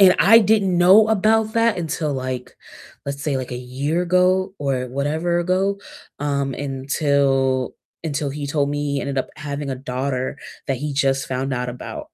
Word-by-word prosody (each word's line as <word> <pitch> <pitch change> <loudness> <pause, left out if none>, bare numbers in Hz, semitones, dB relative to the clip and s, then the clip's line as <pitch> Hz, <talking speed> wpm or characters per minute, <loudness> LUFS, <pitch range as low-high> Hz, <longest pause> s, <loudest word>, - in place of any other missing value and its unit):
And 185 -2 +8
I 215 +6 +8
didn't 200 -5 +2
know 195 +5 +7
about 220 +1 +2
that 230 -1 +3
until, 155 -2 -2
like, 130 -1 -5 0.5
let's 140 0 -4
say, 145 -2 0
like, 130 -1 -4
a 125 - -3
year 135 +7 -2
ago 185 +2 +2
or 135 -3 -1
whatever 155 +6 -1
ago, 190 +3 0 0.4
um, 140 -2 -1
until 135 -1 0 0.3
until 145 -2 -2
he 145 +1 -5
told 140 0 0
me 145 -1 -2
he 140 - 0
ended 140 -1 -2
up 130 - -2
having 145 -2 -4
a 130 - -3
daughter 130 +1 -3 0.3
that 135 - 0
he 150 +1 -3
just 135 -1 +1
found 130 +1 -2
out 125 0 -2
about. 300 - -7
145 Hz, 175 wpm, -21 LUFS, 135-180 Hz, 0.5 s, And